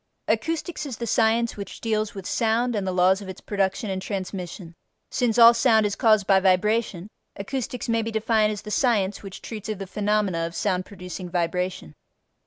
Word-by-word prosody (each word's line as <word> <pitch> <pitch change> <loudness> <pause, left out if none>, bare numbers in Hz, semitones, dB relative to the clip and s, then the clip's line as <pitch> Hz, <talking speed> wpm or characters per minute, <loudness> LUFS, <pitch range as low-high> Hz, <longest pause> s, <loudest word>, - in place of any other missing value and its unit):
Acoustics 325 -1 -1
is 250 -5 -6
the 235 - -4
science 230 0 +2
which 200 -2 -8
deals 215 -2 -1
with 195 -2 -7
sound 230 +2 +1
and 200 -2 -2
the - - 0
laws 185 +2 +3
of 195 - -8
its 190 - -8
production 200 +1 -1
and 190 0 -3
transmission. 185 -3 -5 0.4
Since 245 -3 0
all 235 0 +9
sound 230 -2 +4
is 205 -1 -1
caused 215 -3 +3
by 195 -1 +5
vibration, 190 0 +1 0.3
acoustics 250 +4 -4
may 230 -1 +1
be 225 - -3
defined 220 -1 +2
as 210 - -6
the 210 - -7
science 210 -5 +1
which 195 -2 -10
treats 220 -2 -7
of 215 - -2
the 195 - -6
phenomena 200 -3 0
of 170 - -10
sound 185 -3 -1
producing 180 -2 -8
vibration. 175 - -2
210 Hz, 190 wpm, -24 LUFS, 190-225 Hz, 0.4 s, all